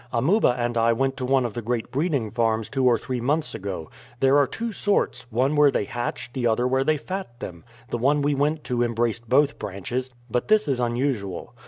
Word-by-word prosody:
"Amuba 135 - +3
and 120 -1 -1
I 115 +1 +4
went 135 +3 0
to 130 - -3
one 135 -1 +3
of 115 - -3
the 120 - -4
great 115 0 -2
breeding 140 - 0
farms 115 -1 0
two 135 -1 0
or 120 -2 +5
three 130 -1 -4
months 150 +5 0
ago. 95 -6 -5 0.3
There 135 +1 +4
are 140 - +3
two 230 0 -4
sorts 205 - 0
one 130 +5 +1
where 145 -1 +6
they 135 - 0
hatch, 120 +3 -4
the 125 -3 0
other 120 +2 +2
where 130 +1 +2
they 155 +2 +2
fat 170 -6 -6
them. 85 -8 -8 0.3
The 120 - -1
one 140 +4 +2
we 145 +1 +2
went 150 +2 0
to 125 -3 -1
embraced 115 -1 -1
both 140 +2 +3
branches, 120 +7 -4 0.2
but 125 +1 -1
this 215 -4 +3
is 135 -3 0
unusual. 120 -5 -2
125 Hz, 215 wpm, -24 LUFS, 115-140 Hz, 0.3 s, where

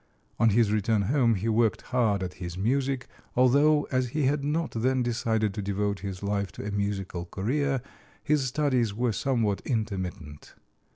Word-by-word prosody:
On 115 - +5
his 110 0 +3
return 105 0 +1
home 120 0 +3
he 100 +4 -3
worked 110 -2 +2
hard 110 -6 +2
at 90 0 -4
his 85 0 -5
music, 130 +5 0 0.3
although 145 +4 +4
as 130 -1 +1
he 150 +5 -1
had 140 +2 +1
not 155 +3 -1
then 125 +3 +1
decided 110 -3 0
to 105 - -4
devote 100 0 -1
his 95 -1 -6
life 100 -1 -1
to - - -7
a 105 - -3
musical 100 -3 -2
career, 130 +8 -1 0.4
his 150 -2 +2
studies 125 -5 +1
were 120 +1 +1
somewhat 110 -3 0
intermittent. 95 - -4
115 Hz, 165 wpm, -27 LUFS, 100-130 Hz, 0.4 s, On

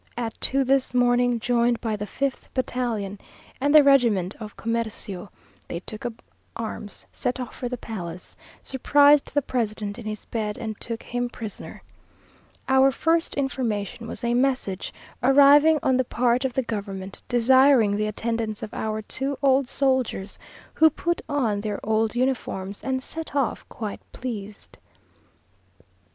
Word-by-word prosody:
At 230 -2 -2
two 270 +1 +2
this 265 -1 +1
morning, 245 -1 +3
joined 240 0 +2
by 225 -3 -2
the 210 0 -5
fifth 275 +5 -3
battalion 235 -6 -2 0.4
and 285 +2 +3
the 300 - +10
regiment 235 -9 +4
of 215 -2 -9
comercio, 220 -4 -3 0.4
they 170 - -4
took 215 +4 -3
up 230 -1 -10 0.3
arms, 220 -2 -6
set 250 +1 -2
off 250 - -5
for 245 - -4
the 250 - -4
palace, 180 -7 -7 0.3
surprised 285 +2 +4
the 290 - +1
president 215 -4 -2
in 225 - -7
his 215 -1 -5
bed, 210 -2 -3
and 220 -3 -6
took 230 -1 -4
him 245 0 -2
prisoner. 220 -4 -8 0.8
Our 265 0 +5
first 325 +5 +1
information 230 -5 -2
was 240 - -7
a 235 0 +1
message, 250 -7 0 0.3
arriving 285 +4 +6
on 260 -1 +3
the 260 - +3
part 245 +1 +1
of 260 - -1
the 265 - 0
government, 200 -4 -5
desiring 245 -2 +5
the 215 +1 0
attendance 220 0 -3
of 215 - -7
our 215 0 -3
two 270 +5 -3
old 270 -1 +4
soldiers, 260 -7 0 0.3
who 320 0 +6
put 345 +2 -2
on 235 -8 0
their 205 -1 -3
old 220 +1 +1
uniforms, 235 -6 -2
and 260 -1 -1
set 320 0 -6
off 275 -4 -1
quite 215 -3 -6
pleased. 215 -5 -7
240 Hz, 150 wpm, -25 LUFS, 215-265 Hz, 0.8 s, the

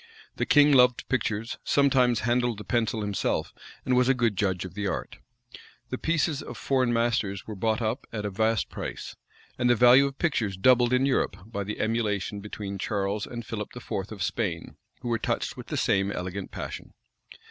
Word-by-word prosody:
The - - -1
king 145 0 +6
loved 125 -3 +4
pictures, 115 -3 -1
sometimes 130 -5 +3
handled 120 0 +1
the 105 - -7
pencil 115 +1 0
himself, 100 -2 -1 0.3
and 130 - +2
was 125 +1 +3
a 135 - +4
good 115 -4 +1
judge 95 -2 0
of 90 - -8
the 105 0 -2
art. - - -4 0.7
The - - -3
pieces 160 -3 0
of - - -8
foreign 130 -3 +1
masters 115 -4 0
were 110 - -6
bought 110 +3 0
up 110 +5 -2
at 105 -2 -4
a 105 - -2
vast 110 +2 +1
price; - - -6 0.4
and 125 -1 +2
the 120 - +5
value 125 +4 +7
of 135 0 -8
pictures 115 - 0
doubled 120 +4 +4
in 125 +1 +3
Europe 135 -2 +1
by 105 -2 -4
the 105 +2 -5
emulation 105 -3 -1
between 100 -1 -6
Charles 100 +1 -2
and 120 -1 -7
Philip 105 +1 -6
IV. 100 -4 -4
of 100 -4 -4
Spain, 90 -8 -3 0.3
who - - -6
were 115 -1 0
touched - - -2
with - - -9
the - - -3
same 100 0 +2
elegant 90 +1 -5
passion. - - -7
115 Hz, 190 wpm, -27 LUFS, 100-125 Hz, 0.7 s, value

